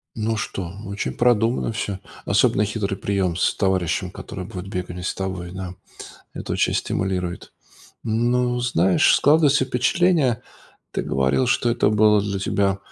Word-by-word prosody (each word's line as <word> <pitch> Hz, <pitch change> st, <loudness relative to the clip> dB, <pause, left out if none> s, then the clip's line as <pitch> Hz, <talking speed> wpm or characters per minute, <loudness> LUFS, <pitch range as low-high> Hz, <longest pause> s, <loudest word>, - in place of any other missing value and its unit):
Ну 110 Hz, 0 st, -1 dB
что, 95 Hz, -4 st, -4 dB
очень 100 Hz, +1 st, -3 dB
продуманно 120 Hz, 0 st, +2 dB
всё. 105 Hz, -4 st, -3 dB, 0.3 s
Особенно 105 Hz, -, +3 dB
хитрый 100 Hz, -2 st, -2 dB
прием 95 Hz, -3 st, -1 dB
с -, -, +1 dB
товарищем, 95 Hz, -1 st, 0 dB
который 100 Hz, 0 st, -7 dB
будет 90 Hz, 0 st, -7 dB
бегать 90 Hz, -2 st, -5 dB
не 90 Hz, -, -6 dB
с -, -, -1 dB
тобой, 95 Hz, -2 st, -4 dB
да. 95 Hz, -1 st, -6 dB, 0.6 s
Это -, -, -5 dB
очень -, -, +1 dB
стимулирует. 90 Hz, -2 st, -2 dB, 0.5 s
Ну, 120 Hz, +2 st, +1 dB
знаешь, 95 Hz, -7 st, +3 dB
складывается 145 Hz, -2 st, +4 dB
впечатление, 130 Hz, 0 st, +2 dB, 0.5 s
ты -, -, -2 dB
говорил, 65 Hz, -, +1 dB
что 120 Hz, -, +2 dB
это 115 Hz, -3 st, +2 dB
было 105 Hz, -1 st, +4 dB
для 100 Hz, -1 st, -2 dB
тебя 100 Hz, 0 st, 0 dB
100 Hz, 145 wpm, -22 LUFS, 95-120 Hz, 0.6 s, складывается